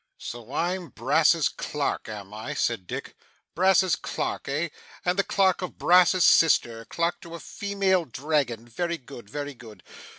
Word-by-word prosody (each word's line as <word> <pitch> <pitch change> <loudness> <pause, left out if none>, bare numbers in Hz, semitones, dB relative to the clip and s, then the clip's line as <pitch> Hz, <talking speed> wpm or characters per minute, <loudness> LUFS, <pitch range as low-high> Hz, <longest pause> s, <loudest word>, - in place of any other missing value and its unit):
'So 120 0 -8
I'm 175 +3 -2
Brass's 155 +6 +3
clerk, 145 -5 -3
am 105 -2 -8
I?' 110 +1 -6
said 110 -7 -1
Dick. - - -6 0.4
'Brass's 185 0 +4
clerk, - - -4
eh? - - -1 0.4
And 180 +2 +1
the - - +4
clerk 190 -2 +2
of 180 - -6
Brass's 180 0 +5
sister 115 -8 +4
clerk 170 +1 -2
to 170 0 -9
a - - -8
female 195 -3 0
Dragon. 130 -4 -1
Very 170 +8 -2
good, 125 -6 -12
very 145 +3 -5
good! 115 -4 -14
155 Hz, 155 wpm, -26 LUFS, 120-180 Hz, 0.4 s, Brass's